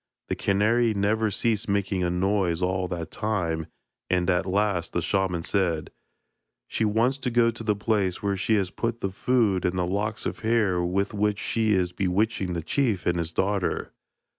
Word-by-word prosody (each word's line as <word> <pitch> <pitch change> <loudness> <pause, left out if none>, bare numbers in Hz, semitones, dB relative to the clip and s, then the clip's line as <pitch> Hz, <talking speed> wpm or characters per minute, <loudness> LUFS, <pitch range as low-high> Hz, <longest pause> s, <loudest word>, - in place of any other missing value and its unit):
The - - 0
canary 110 +3 +2
never 105 +2 +1
ceased 105 0 0
making 100 -2 0
a 90 - +1
noise 90 -1 +1
all 95 0 0
that 85 -3 -5
time, 85 -7 -2 0.4
and 90 0 +2
at 90 +1 0
last 95 -3 0
the 85 - 0
shaman 90 -2 0
said: 85 -6 0 0.8
'She 110 - 0
wants 115 +6 +1
to 125 - -1
go 115 -1 +3
to 115 0 -7
the 105 -2 +1
place 100 -3 0
where 100 -1 +1
she 110 +4 +1
has 95 -3 0
put 115 0 -3
the 95 - -1
food 105 -3 +1
and 90 +1 0
the 90 - +1
locks 105 +4 -2
of - - -3
hair 110 -6 +2
with 95 +4 0
which 105 0 +1
she 110 +1 +1
is 90 -2 +1
bewitching 95 +1 0
the 85 -2 -3
chief 110 - 0
and 85 0 +1
his 85 -1 -2
daughter. 95 +1 -1
100 Hz, 185 wpm, -26 LUFS, 90-110 Hz, 0.8 s, go